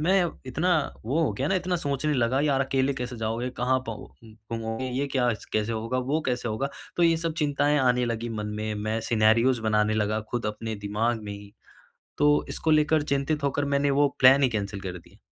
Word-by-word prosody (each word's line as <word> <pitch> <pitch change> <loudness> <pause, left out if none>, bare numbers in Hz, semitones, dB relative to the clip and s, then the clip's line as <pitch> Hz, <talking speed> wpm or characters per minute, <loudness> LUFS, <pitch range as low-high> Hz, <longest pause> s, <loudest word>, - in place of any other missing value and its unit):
मैं 185 +3 +3 0.2
इतना 160 +8 0 0.3
वो 135 +8 0
हो 160 - +1
गया 135 +3 -2
ना 195 - +1
इतना 180 0 0
सोचने 145 -1 -1
लगा 125 +2 +1
यार 140 -2 +2
अकेले 135 0 +1
कैसे 125 -1 -5
जाओगे 115 +3 -2
कहाँ 130 +2 +2
पाओ 115 -2 -6 0.5
घूमोगे, 115 +2 -3
ये 135 +3 -1
क्या 125 -3 +2 0.2
कैसे 110 +1 0
होगा, 115 +3 -2
वो 140 +5 0
कैसे 125 -2 -1
होगा, 130 +6 -2 0.3
तो 175 - +2
ये 165 -1 +5
सब 165 0 -2
चिंताएँ 145 0 +2
आने 125 -1 +2
लगीं 115 0 -3
मन 105 -1 -3
में, 110 0 -3
मैं 110 +2 -2
सिनेरियोज़ 115 +2 +3
बनाने 110 0 +2
लगा, 110 0 0
खुद 120 -2 -2
अपने 110 +1 -4
दिमाग 110 +3 0
में 105 - -5
ही। 100 0 -11 0.7
तो 145 0 +4
इसको 155 +3 -2
लेकर 155 0 +3
चिंतित 140 +1 -1
होकर 140 +1 0
मैंने 140 0 +1
वो 145 +1 +3
प्लान 135 +2 +7
ही 130 - +5
कैंसल 100 -2 -3
कर 90 -2 -6
दिया, - - -20
125 Hz, 205 wpm, -26 LUFS, 110-145 Hz, 0.7 s, प्लान